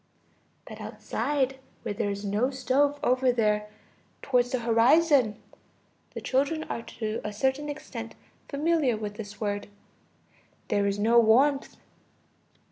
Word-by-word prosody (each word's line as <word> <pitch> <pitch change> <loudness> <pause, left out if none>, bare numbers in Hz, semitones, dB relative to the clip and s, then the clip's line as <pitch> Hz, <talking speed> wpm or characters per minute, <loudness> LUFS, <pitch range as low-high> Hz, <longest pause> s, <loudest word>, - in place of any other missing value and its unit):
But - - -10
outside, 270 -2 -2 0.2
where - - -3
there 205 0 -1
is 200 +1 -4
no 210 +6 +1
stove, 280 +2 +1
over 255 0 +3
there, 210 -3 +1 0.6
towards 250 -2 +2
the 255 -1 -1
horizon 240 0 +4 0.8
(the - - -4
children 285 +4 0
are 230 - -4
to 220 -1 -5
a 210 - -3
certain 265 +7 -1
extent 265 -6 -7 0.3
familiar 295 -4 +1
with 210 -1 -5
this 205 -1 -9
word), 205 -1 -2 1.0
there 200 0 +2
is 200 0 0
no 230 +3 +4
warmth. 265 +5 +3
245 Hz, 125 wpm, -27 LUFS, 215-275 Hz, 1.0 s, horizon